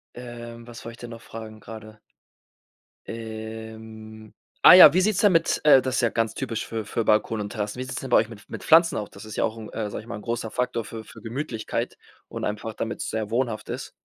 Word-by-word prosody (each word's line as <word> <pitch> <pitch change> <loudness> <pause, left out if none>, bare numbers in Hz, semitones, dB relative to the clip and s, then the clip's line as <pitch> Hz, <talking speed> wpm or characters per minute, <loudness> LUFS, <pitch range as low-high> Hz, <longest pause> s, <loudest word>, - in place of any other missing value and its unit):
ähm, 120 -1 -9
was 120 -1 -11
wollt 115 - -7
ich - - -15
denn 120 - -8
noch 115 0 -9
fragen 110 -1 -9
grade? 110 -1 -11 1.1
Ähm, 110 -1 -8 0.3
ah - - +11
ja, 180 -5 +11
wie 185 - +4
sieht's 210 0 +1
denn 205 -3 +5
mit 165 -1 +2
äh, 150 -3 +8
das 130 -1 -1
ist - - +2
ja 120 - +3
ganz 115 -1 -1
typisch 115 -5 -3
für 110 -2 -4
für 110 +2 -2
Balkone 110 0 +2
und 100 - -7
Terrassen, 105 +2 -4
wie - - -2
sieht's 130 - -5
denn 135 - -6
bei - - +6
euch 110 - +2
mit 105 -3 -13
mit - - -7
Pflanzen 165 +1 +5
auch? 105 - -4
Das 100 +2 -12
ist 110 - -8
ja - - +1
auch 115 0 -1
'n, 110 -2 -8
äh, 105 -2 -3
sage - - -5
ich 110 - -17
mal, - - -5
'n 105 - -11
großer 115 0 -3
Faktor 125 0 -1
für 110 -1 -8
für - - -14
Gemütlichkeit 115 -2 -4 0.3
und - - -4
einfach, 105 +1 -4
damit's 115 - -4
sehr 110 -1 -2
wohnhaft 115 -2 -2
ist. - - -5
115 Hz, 240 wpm, -25 LUFS, 110-120 Hz, 1.1 s, ah